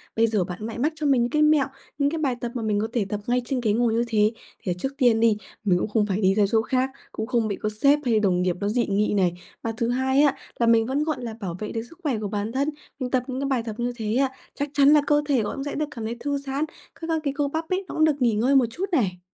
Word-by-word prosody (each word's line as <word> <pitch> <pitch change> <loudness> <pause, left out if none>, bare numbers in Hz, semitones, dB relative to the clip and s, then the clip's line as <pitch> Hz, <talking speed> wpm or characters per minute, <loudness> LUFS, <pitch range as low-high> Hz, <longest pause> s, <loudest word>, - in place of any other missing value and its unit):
Bây 230 +1 +4
giờ 215 -4 +1
bạn 180 +1 -7
lại 225 +1 -5
mách 300 +6 +1
cho 305 -1 -4
mình 270 -4 +4
những 240 - 0
cái 305 +2 +1
mẹo, 300 -2 +5 0.3
những 285 -1 +2
cái 325 - -3
bài 275 -5 0
tập 240 - -3
mà 240 - -2
mình 210 -1 +1
có 215 - 0
thể 230 -5 +1
tập 210 - -2
ngay 250 +1 +2
trên 260 +1 -1
ghế 215 -3 +2
ngồi 235 0 +2
như 230 +1 +2
thế, 215 -2 +3 0.3
thì 185 - -1
trước 270 - -2
tiên 240 -5 +4
đi, 225 -2 +4 0.3
mình 185 -4 +3
cũng - - -1
không 210 0 +2
phải 200 0 -1
đi 190 -1 +4
ra 210 - +4
chỗ 225 -1 +4
khác, 255 +3 0 0.2
cũng 220 - -4
không 235 -3 +1
bị 205 - -2
có 215 - -2
sếp 285 +1 +5
hay 230 -3 +3
đồng 185 -4 +2
nghiệp 180 -1 +1
nó 200 - -1
dị 235 +2 +1
nghị 205 +1 +1
này. 185 -4 +2 0.3
Và 230 - -2
thứ 230 +1 0
hai 265 +2 +2
á, 285 -2 +4 0.2
là 235 - +3
mình 230 -1 +5
vẫn, 270 +5 0
gọi 310 -1 -1
là, 230 -2 -4
bảo 185 -6 -4
vệ 210 - -4
được 225 - -2
sức 335 - -17
khỏe 275 -7 0
của 210 - -3
bản 205 +1 -3
thân, 275 +4 0 0.3
mình 250 -2 -3
tập 255 -2 +2
những 260 -1 -3
cái 275 - -1
bài 260 -4 0
tập 220 -2 -5
như 240 +1 0
thế 220 -1 -2
á, 270 +1 +3 0.3
chắc 285 +1 -2
chắn 280 -1 +5
là 300 - +6
cơ 295 0 +4
thể 265 -5 +3
có 210 - -3
cũng 275 - -4
sẽ 285 - -4
được 305 - 0
cảm 225 -2 -6
thấy 230 +2 -4
thư 285 +3 -1
giãn, 280 +2 -2 0.3
các 330 - -7
các 325 -1 +1
cái 280 -2 -1
cơ 290 -1 +1
bắp 320 +3 -4
ấy, 375 +1 -1
nó - - -7
cũng 315 - +4
được 295 -3 +1
nghỉ 235 -3 +3
ngơi 245 +6 +2
một 265 -2 +6
chút 355 +11 -3
này. 195 - +1
240 Hz, 315 wpm, -24 LUFS, 215-280 Hz, 0.3 s, là